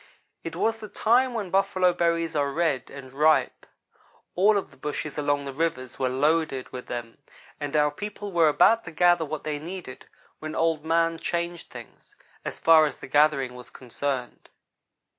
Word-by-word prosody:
"It - - -6
was 225 0 0
the 215 - -8
time 245 +4 +2
when 200 -5 -4
buffalo 190 -2 +2
berries 170 -1 0
are 140 -1 +1
red 155 -3 -1
and 130 -2 -11
ripe. 155 +3 +2 0.7
All 205 +3 +4
of 200 - -4
the - - -18
bushes 150 0 -5
along 145 -1 0
the 135 - -6
rivers 135 -5 -3
were 130 -1 +1
loaded 145 0 0
with 125 -1 -8
them, 120 0 -6 0.4
and 145 0 -4
our 150 -1 +3
people 205 +4 -7
were 165 -3 +4
about 225 +9 +4
to 160 - -7
gather 175 0 +3
what 155 0 -5
they 150 -1 -3
needed, 170 -4 -8 0.3
when 155 0 -6
Old 165 -2 +1
man 165 0 +1
changed 170 0 -3
things, 120 -2 -13 0.3
as - - -5
far 160 -1 +6
as 145 - -7
the - - -10
gathering 140 -2 +2
was 125 0 -11
concerned. 130 0 -5
155 Hz, 175 wpm, -26 LUFS, 140-175 Hz, 0.7 s, far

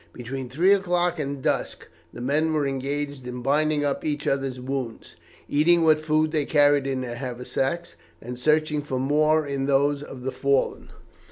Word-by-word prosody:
Between 125 +1 -6
three 175 +10 +4
o'clock 180 -3 +1
and 140 -2 -4
dusk - - -2 0.2
the 120 - -9
men 150 +5 +1
were 150 -2 +1
engaged 140 0 -3
in 125 0 -6
binding 150 +2 +1
up 140 - -1
each 150 -1 -2
other's 135 -2 -1
wounds, 130 -2 -5 0.3
eating 165 +3 +3
what 155 -1 +5
food 155 0 +1
they 155 -2 +1
carried 145 -2 +3
in 135 -1 -1
their 120 -2 -5
haversacks, 130 +6 -3 0.2
and 125 +4 -8
searching 150 +1 +2
for 135 -3 -4
more 150 +3 +2
in 140 -1 -2
those 140 +1 +2
of 135 -3 -9
the 135 - -2
fallen. 135 +1 0
140 Hz, 170 wpm, -25 LUFS, 130-155 Hz, 0.3 s, what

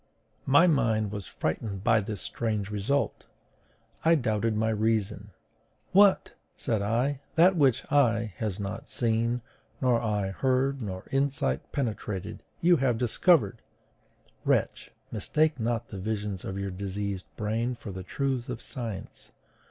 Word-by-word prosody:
My 145 +6 +6
mind 115 - +2
was 105 -3 -5
frightened 100 +4 -3
by 110 -1 +4
this 100 -1 -5
strange 105 -3 -2
result: 105 +8 -1 0.8
I 165 +1 +5
doubted 110 -5 0
my 110 +1 +1
reason. 105 -2 0 0.6
What! 200 +1 +5 0.2
said 110 -3 0
I, 125 +7 0
that 180 +4 +6
which 135 -7 +3
eye 115 -7 +3
has 105 -4 -3
not 100 +1 -5
seen, 115 +1 0 0.4
nor 125 -3 +2
ear 105 -4 -1
heard, 130 +4 +1
nor 95 -3 -5
insight 140 +1 0
penetrated, 105 - -3 0.2
you 175 0 +5
have 125 -4 +1
discovered! 125 - +3 0.8
Wretch, - - 0 0.2
mistake 150 +7 +1
not 115 0 -1
the 100 - -6
visions 105 -1 -3
of 95 - -4
your 100 0 -3
diseased 100 0 -4
brain 115 +4 -1
for 110 - -8
the 95 0 -6
truths 130 +5 -2
of 125 -2 -4
science! 115 -6 -5
115 Hz, 135 wpm, -28 LUFS, 105-130 Hz, 0.8 s, My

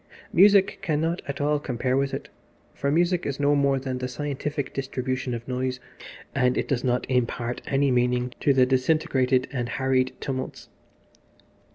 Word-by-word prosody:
Music 200 +1 +5
cannot 160 +2 0
at 140 0 -4
all 145 +1 +1
compare 130 -2 -1
with 135 0 +1
it, - - -5 0.5
for 140 - -2
music 175 +3 +2
is 140 -1 -3
no 145 0 +3
more 140 -1 +3
than 130 -1 -3
the 125 - -2
scientific 145 +2 -4
distribution 130 -2 -3
of 115 +1 -8
noise, 130 0 -2 0.5
and 125 0 +2
it - - -1
does 130 -4 -1
not 125 -1 +1
impart 120 -1 -1
any 140 0 +2
meaning 125 0 +1
to 145 - +3
the 130 -2 +5
disintegrated 130 -1 +2
and 120 -3 -3
harried 130 -1 +1
tumults. 130 -1 -5
130 Hz, 160 wpm, -25 LUFS, 125-145 Hz, 0.5 s, Music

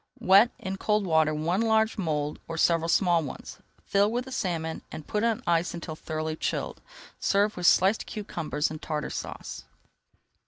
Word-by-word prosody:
Wet 200 +5 +6
in 190 0 -5
cold 210 0 +1
water 160 -3 +3
one 165 +6 0
large 220 -1 +2
mould 150 -6 -2
or 165 - -5
several 165 0 +2
small 175 -1 +3
ones, 145 - -8 0.3
fill 200 +1 +2
with 245 +2 -2
the 265 - -10
salmon 165 -9 -2
and 155 - -7
put 210 +1 -1
on 230 -2 0
ice 170 +1 +1
until 170 -2 -6
thoroughly 155 0 -4
chilled. - - -3 0.4
Serve 205 +2 +2
with 180 -1 0
sliced 195 +4 +4
cucumbers 155 -8 -3
and 155 - -7
Tartar 150 -1 -3
Sauce. - - -6
175 Hz, 165 wpm, -27 LUFS, 160-210 Hz, 0.4 s, Wet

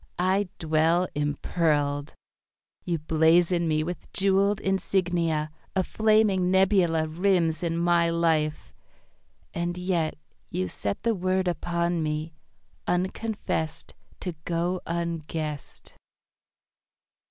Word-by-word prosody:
I 185 +2 +1
dwell 160 +3 +2
impearled. 145 0 0 0.7
You 170 -2 -1
blazon 165 +3 +3
me 155 -1 +1
with 175 +2 -6
jewelled 195 +1 +3
insignia. 175 -5 0 0.2
A 190 - +2
flaming 215 -3 +2
nebula 185 -4 +3
Rims 170 -1 +1
in 165 -1 -1
my 170 0 +3
life. 160 -2 0 0.8
And 175 +1 -2
yet 180 -3 0 0.3
You 90 0 -2
set 100 +2 -3
The 230 - +2
word 185 -1 0
upon 170 -1 -1
me, 155 +1 -2 0.5
unconfessed 180 -3 -2 0.3
To 180 - -3
go 175 +2 -1
unguessed. 165 -3 -4
170 Hz, 95 wpm, -26 LUFS, 160-185 Hz, 0.8 s, blazon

